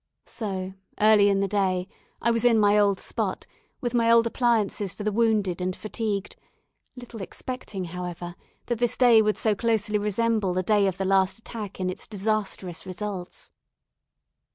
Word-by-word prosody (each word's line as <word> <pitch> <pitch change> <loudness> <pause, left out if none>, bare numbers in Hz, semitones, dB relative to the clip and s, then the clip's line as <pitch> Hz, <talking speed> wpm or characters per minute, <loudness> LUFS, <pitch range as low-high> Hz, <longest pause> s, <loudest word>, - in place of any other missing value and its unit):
So, 190 -4 -5 0.3
early 210 -1 +6
in 195 0 +2
the 200 - +1
day, 185 -2 0 0.4
I 235 - +3
was 230 -1 0
in 240 -2 +5
my 205 -1 +4
old 200 -2 +3
spot, - - -3 0.4
with 240 -1 -2
my 230 -1 +3
old 230 0 +6
appliances 225 -5 0
for 205 - -7
the 215 - 0
wounded 210 -5 +1
and 185 0 -1
fatigued; 215 -2 -4 0.6
little 245 -3 -9
expecting, 195 0 -6
however, 175 0 -6 0.3
that 240 -2 -2
this 240 -1 +1
day 240 -3 +6
would 215 -1 +1
so 220 - +2
closely 210 -1 0
resemble 210 -1 0
the 185 - 0
day 205 0 +3
of 190 -1 -2
the 195 - -2
last 190 +1 +2
attack 220 -3 -8
in 185 - -1
its 185 - -5
disastrous 200 -4 -2
results. 190 - -6
205 Hz, 165 wpm, -25 LUFS, 190-225 Hz, 0.6 s, early